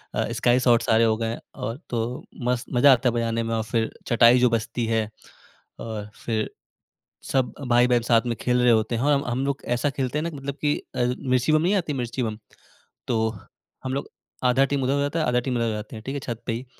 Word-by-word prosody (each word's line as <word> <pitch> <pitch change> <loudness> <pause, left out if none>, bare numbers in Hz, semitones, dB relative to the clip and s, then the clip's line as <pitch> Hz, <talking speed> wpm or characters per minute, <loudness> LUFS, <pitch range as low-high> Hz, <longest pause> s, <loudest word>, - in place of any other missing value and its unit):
अ, 115 - -1
sky 120 +2 +3
shot 120 -2 +4
सारे 110 +1 +3
हो 110 -1 +3
गए 115 0 -2 0.2
और 115 +3 -4
तो 120 - -1 0.4
मस्त 125 0 0
मजा 130 +3 +6
आता 125 0 +2
है - - -3
बजाने 115 0 0
में 115 0 -2
और 110 - -1
फिर 110 +1 -1 0.2
चटाई 120 +1 +6
जो 125 - +4
बजती 115 +1 -1
है 115 0 +1 0.8
और 105 -2 -6 0.2
फिर 110 -2 -1 0.8
सब 130 -2 +1 0.2
भाई-बहन 120 0 +4
साथ 115 -2 +5
में 120 - -1
खेल 125 0 +2
रहे 125 -1 +5
होते 110 +1 +2
हैं 120 - -1
और 145 - +3
हम 140 0 +1
हम 125 +3 -1
लोग 140 0 -2
ऐसा 125 +4 0
खेलते 135 0 -2
हैं 155 - -2
ना 170 - -2
कि 155 - -10
मतलब 140 0 -5
कि 145 -1 +2 0.2
अ, - - -2 0.3
मिर्ची 130 +3 +2
बम 155 - +4
नहीं 185 +5 +2
आती, 170 -6 -1
मिर्ची 125 -1 -3
बम, 110 -2 -3 0.7
तो 110 -2 +1 0.5
हम 130 0 -3
लोग 140 - -3 0.4
आधा 130 +2 +4
टीम 140 -2 0
उधर 130 +2 +1
हो 140 - +1
जाता 145 +4 -1
है, 155 - +1
आधा 125 0 +2
टीम 125 0 -2
इधर 115 - +1
हो - - 0
जाते 105 +1 -6
हैं। 110 - -9
ठीक 135 +2 -4
है, - - -2
छत 120 -2 -5
पे 115 - 0
ही 120 +3 -5
120 Hz, 245 wpm, -24 LUFS, 115-135 Hz, 0.8 s, मजा